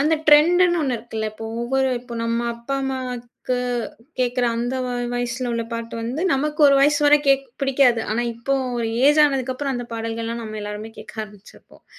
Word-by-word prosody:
அந்த 310 +3 +3
டிரெண்ட்ன்னு 345 +4 +6
ஒண்ணு 265 -4 0
இருக்குல்ல. 220 -1 -5
இப்போ 225 +1 -9 0.2
ஒவ்வொரு 265 +2 +1
இப்போ 240 -1 -10
நம்ம 230 0 0
அப்பா 235 +4 -5
அம்மாக்கு 255 -1 -4 0.6
கேக்குற 250 0 +1
அந்த 245 +2 -2
வ - - -3 0.3
வயசுல 245 +1 -2
உள்ள 230 -1 -1
பாட்டு 230 0 -5
வந்து 245 +7 -3
நமக்கு 300 +3 -1
ஒரு 280 - +5
வயசு 290 +2 +4
வர 295 - +7
கேக்க 275 0 +3 0.2
பிடிக்காது. 265 -3 +3
ஆனா 235 - 0
இப்போ 255 +4 -1 0.2
ஒரு 230 - -1 0.2
ஏஜ் 295 +1 +5
ஆனதுக்கு 270 -3 0
அப்புறம் 275 +1 -2
அந்தப் 240 -1 -6
பாடல்கள்லாம் 230 +1 -4
நம்ம 215 -1 -6
எல்லாருமே 210 +2 -6
கேக்க - - -11
ஆரம்பிச்சிருப்போம். 205 -1 -18
245 Hz, 175 wpm, -22 LUFS, 230-275 Hz, 0.6 s, வர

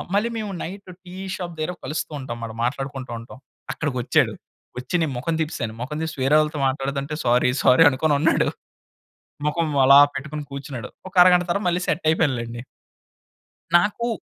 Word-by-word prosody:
మళ్ళీ 210 +3 +2
మేము 215 -2 -4
night 190 +1 -8
tea 180 0 -11 0.2
shop 175 -2 -6
దగ్గర 155 +3 -2
కలుస్తూ 155 +1 -3
ఉంటాంమాట. 120 -3 -6
మాట్లాడుకుంటా 130 0 -3
ఉంటాం. 120 +3 -12 0.3
అక్కడకొచ్చాడు. 130 -6 0 0.5
ఒచ్చి 125 +7 -4
నేను 150 -4 -2
మొఖం 160 +7 -2
తిప్పేశాను. 115 -8 -3
మొఖం 145 +5 -4
తీసి 160 0 -4
వేరే 140 +3 +4
వాళ్ళతో 150 -1 -1
మాట్లాడతంటే, 140 +2 -2
సారీ, 125 +1 +3
సారీ 130 +5 +6
అనుకోనున్నాడు. 145 +3 +2 1.0
మొఖం 165 +1 -1 0.2
అలా 140 +1 +9 0.2
పెట్టుకొని 150 +1 -5
కూర్చున్నాడు. 140 -4 -6 0.2
ఒక - - -30
అరగంట 180 0 +5
తర్వాత 200 +4 0
మళ్ళీ 175 +1 0
సెట్టయిపోయానులేండి. 130 -8 0 1.1
నాకు 215 +5 0
150 Hz, 140 wpm, -23 LUFS, 130-170 Hz, 1.1 s, అలా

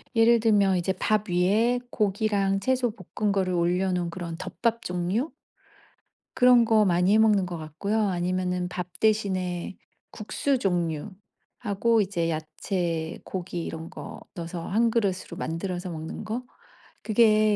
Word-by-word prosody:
예를 230 +1 +5
들면 205 -4 +3
이제 180 +2 0
밥 215 +2 0
위에 205 +8 +2
고기랑 200 -2 +1
채소 250 +2 +1
볶은 210 0 -3
거를 190 -2 0
올려 180 +2 +1
놓은 175 -1 -1
그런 170 -1 -6
덮밥 225 +6 -2
종류? 180 - -1 1.1
그런 250 -2 +7
거 220 -2 +4
많이 180 +1 +3
해 - - +6
먹는 210 -4 +4
것 175 - -5
같고요. 165 +7 -3
아니면은 180 0 -1
밥 180 0 -4
대신에 190 -4 0 0.4
국수 260 +5 -1
종류하고 195 +5 -2
이제 180 -4 -1
야채, 160 +1 -3
고기 175 -2 -5
이런 160 +1 -6
거 180 - -9
넣어서 170 0 -5
1 230 +4 +2
그릇으로 200 -5 -1
만들어서 180 +2 -4
먹는 160 +5 -6
거? 225 +4 -3 0.6
그게 215 -1 +4
190 Hz, 270 characters per minute, -26 LUFS, 175-215 Hz, 1.1 s, 그런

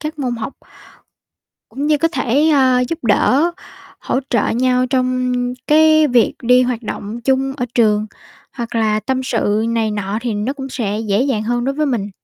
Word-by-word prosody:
các 305 0 -6
môn 250 -4 -2
học. 230 +4 -6 1.1
Cũng 285 +2 -3
như 305 -1 +3
có 330 - +2
thể, 295 -1 +1
a, 260 -4 +4
giúp 300 +5 -3
đỡ 270 +9 +2 0.5
hỗ - - -1
trợ 235 -4 +1
nhau 250 +1 +1
trong 255 -1 0 0.3
cái 310 0 +5
việc 245 -4 +3
đi 250 +1 +4
hoạt 250 -2 -1
động 215 +2 -6
chung 270 +2 0
ở 245 - -1
trường 215 -3 +3 0.5
hoặc 235 -2 -6
là 215 -1 +1
tâm 260 +3 -2
sự 215 -3 0
này 225 -2 0
nọ 205 0 -3
thì 240 -2 -2
nó 210 +6 -2
cũng 270 -2 -7
sẽ 215 -5 -3
dễ 215 -1 0
dàng 255 -6 0
hơn 240 +2 -1
đối 275 +1 -1
với 305 +1 0
mình. 230 -8 -2
250 Hz, 185 wpm, -18 LUFS, 225-270 Hz, 1.1 s, cái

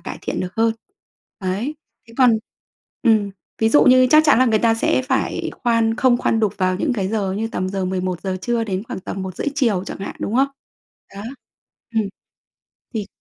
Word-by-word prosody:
cải - - -7
thiện - - -3
được 185 +1 -5
hơn. 225 0 +3 0.7
Đấy, 205 +11 -2 0.3
thế 230 - -14
còn 250 -2 +6 0.7
ừm, 215 -4 +3 0.3
ví 225 - +3
dụ 295 - +5
như 255 0 +6
chắc 310 0 +7
chắn 290 - +6
là 255 - +4
người 220 -2 +3
ta 225 +1 +3
sẽ 230 - +1
phải 265 0 -1
khoan 230 -1 +2
không 250 -2 +4
khoan 225 -2 +1
đục 210 -4 +1
vào 185 0 +1
những 260 +7 0
cái 195 -5 -1
giờ 200 -3 -1
như 220 +3 -2
tầm 185 0 -2
giờ 190 -1 -2
11:00 185 0 -2
trưa 235 -1 0
đến 190 -3 -3
khoảng 190 - -6
tầm 190 +1 -5
1:30 190 +9 -3
chiều 220 - +1
chẳng - - -7
hạn, 195 - -6
đúng 215 - -3
không? 275 +1 +4 0.7
Đó, 200 - -6 0.7
ừm, 220 - +3 0.9
thì 210 -3 -2
225 Hz, 195 wpm, -20 LUFS, 190-240 Hz, 0.9 s, chắc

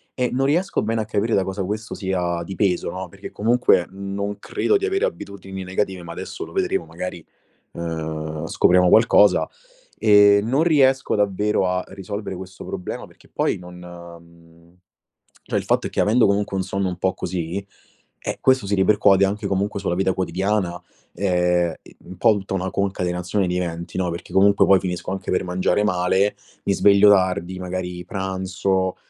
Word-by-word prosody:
e 125 -1 0
non 135 +2 +1
riesco 170 +6 +1
bene 110 +1 -1
a - - -3
capire 110 +1 -1
da 95 - +3
cosa 95 0 -3
questo 105 +3 -4
sia 90 -3 -2
dipeso, 95 -1 -1
no, 95 +1 -5
perché 95 +3 -11
comunque, 115 -4 +3
non 100 +1 -4
credo 425 - 0
di 400 0 +1
avere 400 +4 +1
abitudini 95 - -6
negative, 95 -1 -2
ma 85 - -8
adesso 230 - -6
lo - - -13
vedremo, 385 0 -1
magari, 90 -3 -7 0.5
uhm, 80 -1 -4
scopriamo 90 +1 +4
qualcosa. 105 -3 +5 0.5
Ehm, 105 -1 +5
non 140 +5 +3
riesco 135 -5 +3
davvero 105 -1 +1
a 90 0 0
risolvere 100 0 -6
questo 95 +1 -9
problema, 90 - -6
perché - - -22
poi - - 0
non 90 0 -12
mhmm, 85 -1 -14 0.7
cioè - - -3
il - - -1
fatto - - +1
è - - -14
che - - -1
avendo, 115 +3 +4
comunque, 100 -1 0
un 95 - 0
sonno 95 0 -2
un 90 - -4
po' 95 0 +1
così, 90 +1 -4 0.6
eh, - - -4
questo 130 -5 +3
si 100 - 0
ripercuote, 100 0 +4
anche 100 +1 -3
comunque 100 +1 -1
sulla 95 -3 -1
vita 95 0 +1
quotidiana, 95 0 -1 0.3
ehm, 90 -3 +1
i - - -18
un 90 - -10
po' 115 -3 +4
tutta 95 -1 -5
una 95 0 -2
concatenazione 90 -1 -1
di 90 - -1
eventi, 85 0 -4
no, 90 -2 0
perché, 85 +1 -8
comunque, 100 +1 +5
poi 95 0 +6
finisco 90 0 -4
anche 95 -1 -4
per 90 - +1
mangiare 90 +3 0
male, 95 +1 +1 0.3
mi 100 - +1
sveglio 100 +1 +6
tardi, 95 -1 -1
magari 90 -1 -5
pranzo, 95 0 -2
95 Hz, 175 wpm, -22 LUFS, 90-105 Hz, 0.7 s, poi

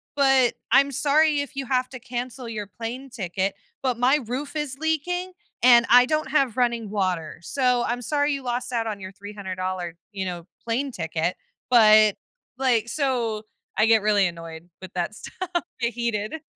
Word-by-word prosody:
but 270 -3 +4 0.2
I'm 275 +3 +5
sorry 295 +2 +3
if 285 0 -7
you 275 -1 -3
have 255 0 +1
to 255 - -8
cancel 245 0 -5
your 210 -2 -5
plane 235 +6 -6
ticket, 195 -3 -2 0.3
but 255 -3 0
my 255 +4 +4
roof 260 +5 -4
is 295 -3 -3
leaking 335 +4 -1 0.3
and 240 -2 +7
I 245 +1 +8
don't 310 0 -1
have 270 -6 +2
running 235 -3 +1
water, 185 -7 -2
so 250 +4 +1
I'm 245 +1 -2
sorry 290 +3 +1
you 275 - -3
lost 245 0 -2
out 230 -1 0
on 210 -2 -4
your 185 0 -8
$300, 185 -4 -5
you 195 -2 -4
know, 175 -2 -5 0.2
plane 255 +4 -1
ticket, 165 -3 -2 0.3
but, 215 -3 +7 0.4
like, 245 -4 +1
so 240 -7 -1 0.3
I 215 - +5
get 225 -1 +5
really 205 -2 +3
annoyed 165 0 -8
with 185 - -10
that 180 +3 -2
stuff, 370 +10 -7 0.3
get 235 -1 0
heated. 235 +4 -2
235 Hz, 170 wpm, -24 LUFS, 205-270 Hz, 0.4 s, I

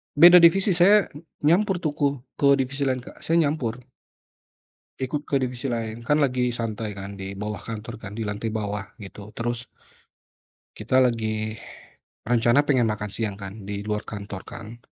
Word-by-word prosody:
Beda 175 +4 +9
divisi 190 +4 +5
saya 190 +4 +6 0.4
nyampur, 195 +4 +3
tuh, 155 - +1
kuh 140 -2 +3 0.3
ke 140 - +4
divisi 135 +2 -1
lain 130 -1 -1
Kak, - - -12
saya 165 - +1
nyampur. 145 -6 -1 1.3
Ikut 145 +3 -4
ke 140 - +3
divisi 125 0 -3
lain, 115 -1 -3
kan, 150 +6 +2
lagi 125 -4 +1
santai, 115 -2 -3
kan, 100 +1 -6
di 95 0 -6
bawah 105 +1 -4
kantor, 115 0 -7
kan, 105 +1 -8
di 115 - -2
lantai 105 +2 -3
bawah 105 -2 -3
gitu 100 0 -10
terus 120 +1 -3 1.1
kita 130 +5 +2
lagi 110 -3 0 0.6
rencana 120 +3 +3
pengen 130 -5 +2
makan 105 -1 -2
siang, 105 0 -2
kan, 100 +1 -9
di 100 0 -4
luar 105 0 -3
kantor, 100 -2 -7
kan. 110 +2 -9
115 Hz, 160 wpm, -24 LUFS, 105-140 Hz, 1.3 s, Beda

